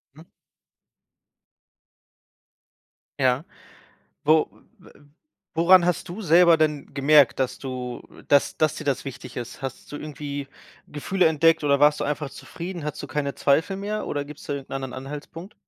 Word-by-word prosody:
Hm. 160 +2 -15 2.9
Ja. 130 +3 +2 0.8
Wo 155 +1 +4 0.3
w 190 - -18 0.6
woran 175 +2 +6
hast 180 -1 -1
du 185 +6 -6
selber 170 -1 +6
denn 150 -3 -1
gemerkt, 145 0 +5
dass 130 -2 -1
du 125 -2 -6 0.3
dass 140 -1 +3
dass 155 -1 +1
dir - - -7
das 140 -2 -1
wichtig 135 -3 -9
ist? 120 -1 -6
Hast 135 +2 -7
du - - -4
irgendwie 145 -2 -6 0.4
Gefühle 180 +5 0
entdeckt 165 +1 +3
oder 140 -1 +3
warst 150 0 +5
du - - 0
einfach 145 -1 -3
zufrieden? 170 0 -7
Hattest 150 - -5
du - - -5
keine 140 -2 -2
Zweifel 160 +7 +1
mehr 210 +2 -4
oder 145 -1 -2
gibst 150 0 -12
da 145 - -1
irgend 140 -1 -8
'nen - - -5
anderen 135 -1 -6
Anhaltspunkt? 150 +7 -8
150 Hz, 155 wpm, -24 LUFS, 140-165 Hz, 2.9 s, woran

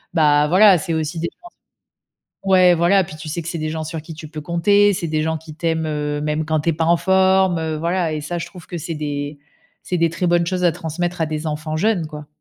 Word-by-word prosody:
Bah, 150 -2 +4
voilà, 190 +2 +6
c'est 165 0 -2
aussi 160 +1 -2
des 170 - -2
chances 350 0 -14 0.9
ouais, 185 -2 +5
voilà, 180 +3 +3
puis, 155 - -10
tu 155 0 -9
sais, 170 +3 -3
que 165 - -7
c'est 170 - -4
des 155 - -2
gens 160 0 -4
sur 160 0 -5
qui 160 +1 -10
tu 155 0 -9
peux 155 0 -7
compter, 200 +6 +3
c'est 170 -2 -3
des 155 0 0
gens 160 0 -1
qui 155 0 -11
t'aiment, 160 0 -1
heu, 150 -1 -2
même 150 +1 -1
quand 155 -1 +1
tu 165 - +1
es - - 0
pas 160 +1 -1
en 170 0 +4
forme, 190 -1 +3
heu, 160 -1 -2
voilà, 170 +1 -1
et 150 - -4
ça, 175 +3 -4
je 165 - -5
trouve 180 -4 -13
que 175 - -6
c'est 165 +1 -5
des 145 -1 -4 0.4
c'est 180 - -2
des 165 -1 +2
très 170 +2 -2
bonnes 170 -1 +2
choses 180 0 -1
à 175 - +4
transmettre 170 +2 -4
à 160 - +2
des 155 +1 -4
enfants 155 +1 -3
jeunes, 185 -1 +1
quoi. 150 -1 -9
165 Hz, 260 wpm, -20 LUFS, 155-175 Hz, 0.9 s, voilà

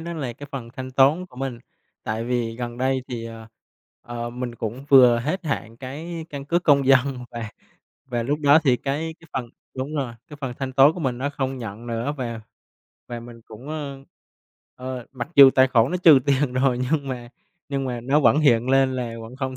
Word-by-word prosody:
đó 170 +1 -5
là 140 -7 -4
cái 145 +4 -11
phần 130 -4 -5
thanh 130 0 -6
toán 140 +7 +3
của 125 - -19
mình. 130 -2 -4 0.4
Tại 110 +1 -3
vì 120 -2 -2
gần 120 -1 -5
đây 130 0 0
thì, 120 -2 -5
ờ, 115 -1 -10 0.6
ờ, 120 0 -5
mình 125 0 -5
cũng 120 +4 -5
vừa 125 -4 +7
hết 155 +10 -3
hạn 115 -6 -3
cái 160 +6 -7
căn 140 -1 -6
cước 170 +4 0
công 140 -3 +4
dân 135 -1 +3
và 115 -3 -6 0.6
và 120 -2 -2
lúc 145 +5 -1
đó 145 +1 +6
thì 130 -4 +4
cái 150 +5 -3
cái 165 - -18
phần 120 -2 -3 0.3
đúng 130 +4 -4
rồi, 130 -5 -3
cái 150 - -10
phần 135 -3 -3
thanh 135 -1 -3
toán 135 +3 +6
của 180 - -7
mình 130 -5 -1
nó 140 +3 -2
không 135 -2 -3
nhận 115 0 -7
nữa. 115 +4 -2
Và 120 -4 -4 0.7
và 120 -1 -6
mình 120 0 -12
cũng, 115 +6 -12
ơ, 140 -3 -6 0.7
ơ, 125 -1 -6
mặc 130 0 -5
dù 140 -1 +10
tài 130 0 +4
khoản 120 -1 +3
nó 180 - 0
trừ 165 -6 +7
tiền 140 -1 +2
rồi 130 -1 +1
nhưng 145 -3 0
mà 120 -2 -5 0.4
nhưng 140 -1 -2
mà 125 -2 -3
nó 135 +5 +2
vẫn 145 - +4
hiện 120 -5 +3
lên 135 -1 +3
là 120 -2 -3
vẫn 115 +3 -10
không 130 -1 -4
130 Hz, 215 wpm, -23 LUFS, 120-140 Hz, 0.7 s, dù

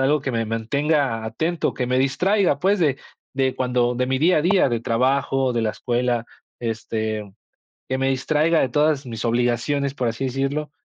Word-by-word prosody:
algo 145 +3 +2
que 135 - -3
me 115 -1 -1
mantenga 115 +2 0
atento, 160 +9 -1
que 125 -2 -2
me 125 0 +2
distraiga, 175 +3 +2
pues 200 +2 +2
de 140 -5 +1 0.3
de 130 -1 0
cuando 125 -1 +1
de 125 +1 0
mi 130 0 0
día 170 +4 +4
a 150 - 0
día, 180 -4 +3
de 120 -1 0
trabajo, 130 +2 +1
de 120 - 0
la 110 - +1
escuela, 120 +1 -1 0.4
este, 110 -2 -3 0.6
que 130 - 0
me 135 0 +1
distraiga 155 +5 +2
de 130 - +1
todas 150 0 +1
mis 115 -2 -5
obligaciones, 120 +4 0
por 125 - -1
así 115 +4 -2
decirlo, 135 +3 -2
130 Hz, 185 wpm, -22 LUFS, 120-145 Hz, 0.6 s, día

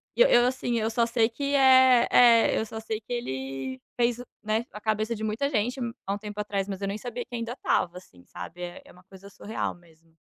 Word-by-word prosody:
E, - - +2
eu - - +7
eu 240 0 +5
assim, 245 -2 -1
eu 220 +1 0
só 230 +1 +1
sei 230 -1 +2
que 280 +4 -3
eh, 260 -2 +6
é, 235 -2 +6
eu 220 - 0
só 220 0 -7
sei 220 0 -4
que 220 - -15
ele 135 - -4 0.2
fez, 235 0 +2 0.2
né, 220 +2 -1
a 210 - -8
cabeça 215 +1 -1
de 220 0 -6
muita 225 +7 -1
gente, 245 +1 -1 0.3
há 195 - -1
um - - -3
tempo 210 0 -8
atrás. 200 -2 -2
Mas, 195 0 -6
eu 195 - -1
nem 200 - -3
sabia 245 +2 -6
que 245 0 -8
ainda 230 +1 -4
estava, 180 -8 0
assim, 90 - -16
sabe. 160 - -9
É, 175 0 -7
é - - -16
uma 180 +1 -19
coisa 195 +1 -14
surreal 210 +2 -4
mesmo. 165 -1 -24
220 Hz, 240 wpm, -27 LUFS, 190-240 Hz, 0.3 s, eu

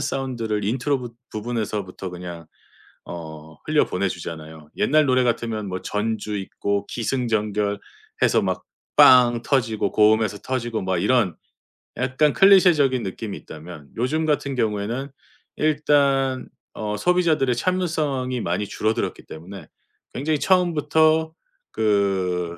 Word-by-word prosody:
사운드를 125 -7 -2
인트로 130 +6 0
부 120 -2 -8 0.2
부분에서부터 105 -4 -4
그냥 85 -2 -8 0.6
어 80 -2 -9
흘려 155 -1 +3
보내 95 +2 -1
주잖아요. 80 -3 -8
옛날 155 0 +3
노래 130 -1 +3
같으면 115 -3 -1
뭐 95 0 -4
전주 105 0 -2
있고 100 +1 -2
기승전결해서 105 -4 -1
막 - - -2 0.4
빵 120 -2 +7
터지고 120 -6 0
고음에서 105 -1 +3
터지고 120 -4 -3
막 95 -1 -1
이런 105 -1 +2 0.6
약간 130 +4 +2
클리셰적인 165 - +5
느낌이 100 +2 -5
있다면 80 -2 -11
요즘 155 +7 0
같은 145 -3 0
경우에는 115 +4 -2 0.5
일단 140 -3 +2 0.3
어 105 -1 -3
소비자들의 160 -3 +2
참을성이 150 -6 -1
많이 90 0 -1
줄어들었기 110 +2 -2
때문에 85 +1 -10 0.5
굉장히 150 +3 -1
처음부터 160 -3 +2 0.4
그 95 -5 0
115 Hz, 290 characters per minute, -23 LUFS, 100-140 Hz, 0.6 s, 빵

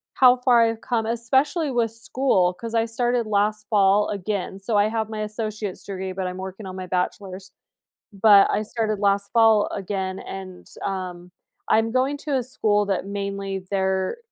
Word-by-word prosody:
how 250 -1 +7
far 250 -1 +4
I've 225 0 -1
come, 230 -3 -1
especially 265 +7 +1
with 235 -2 0
school, 225 -5 +1
'cause 230 +4 -6
I 225 0 +3
started 240 +1 0
last 210 0 0
fall, 205 -1 +3
again. 200 -1 -3
So, 215 +3 -2
I 205 +1 +4
have 220 -1 -2
my 215 -1 -4
associate's 210 -3 -4
degree, 190 -1 -5
but 185 0 -3
I'm 180 0 -5
working 190 +2 -7
on 185 - -7
my 185 -1 -6
bachelor's. 185 +1 -3 0.6
But, 200 0 +6
I - - +1
started 215 -1 -2
last 200 0 +1
fall 225 -2 +5
again 190 -1 -4
and, 190 -1 -9 0.2
um, 180 -2 -5 0.4
I'm 225 +1 +3
going 260 +3 +1
to 290 -1 -3
a 255 - 0
school 210 -4 +1
that, 195 -1 -2
mainly, 200 -1 -4
they're 190 - 0
210 Hz, 170 wpm, -23 LUFS, 190-230 Hz, 0.6 s, how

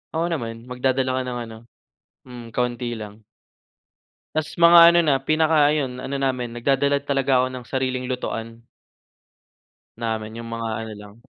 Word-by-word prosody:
Oo 165 - +1
naman, 115 -7 -4
magdadala 130 +1 -1
ka - - -1
ng 125 -1 -4
ano, 115 -1 -10 0.7
hmm, 120 -2 -10
kaunti 120 0 -2
lang. 110 -1 -8 1.1
'Tas, 155 -1 -1
mga 170 0 +8
ano 170 - +4
na, 145 -4 +3
pinaka 155 0 +3
ayun 130 -4 -2
ano 140 - -4
namin, 125 -3 -1
nagdadala 140 +4 +1
talaga 135 -2 +1
ako 130 - 0
ng 130 -1 -7
sariling 130 -1 -2
lutuan. 115 -2 -5 1.4
Namin 110 -1 -4
yung 115 - -9
mga 115 0 -3
ano 110 - -8
lang. 105 0 -13
125 Hz, 150 wpm, -23 LUFS, 115-140 Hz, 1.4 s, mga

